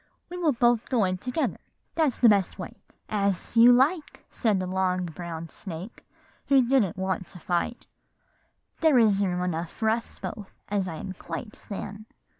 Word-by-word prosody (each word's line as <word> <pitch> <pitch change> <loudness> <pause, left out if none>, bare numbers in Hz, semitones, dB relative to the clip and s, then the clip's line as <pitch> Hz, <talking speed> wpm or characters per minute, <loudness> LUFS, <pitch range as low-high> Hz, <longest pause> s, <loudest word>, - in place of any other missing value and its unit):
We 360 - -5
will 320 -5 +2
both 240 -1 +2
go 245 -5 +2
in 185 -1 0
together, 250 - -2 0.3
that's 310 -6 +1
the 240 - +5
best 200 -4 +3
way.' - - -7 0.3
"'As 200 -1 -1
you 235 +2 +8
like,' 295 +7 +2
said 215 -5 +1
the 185 - -2
long 185 0 0
brown 165 -1 -6
snake, 185 +5 -8 0.4
who 265 -3 +4
didn't 235 -9 +2
want 190 -1 -2
to 180 - -11
fight; 175 +8 -2 0.9
'there 315 -5 +5
is 210 -4 +4
room 180 -2 0
enough 170 -1 -2
for 220 -1 0
us 230 +1 -3
both, 205 -3 -7
as 200 -2 0
I 165 - -5
am 185 +4 -6
quite 185 +4 -7
thin. 205 +1 -8
205 Hz, 170 wpm, -27 LUFS, 185-240 Hz, 0.9 s, you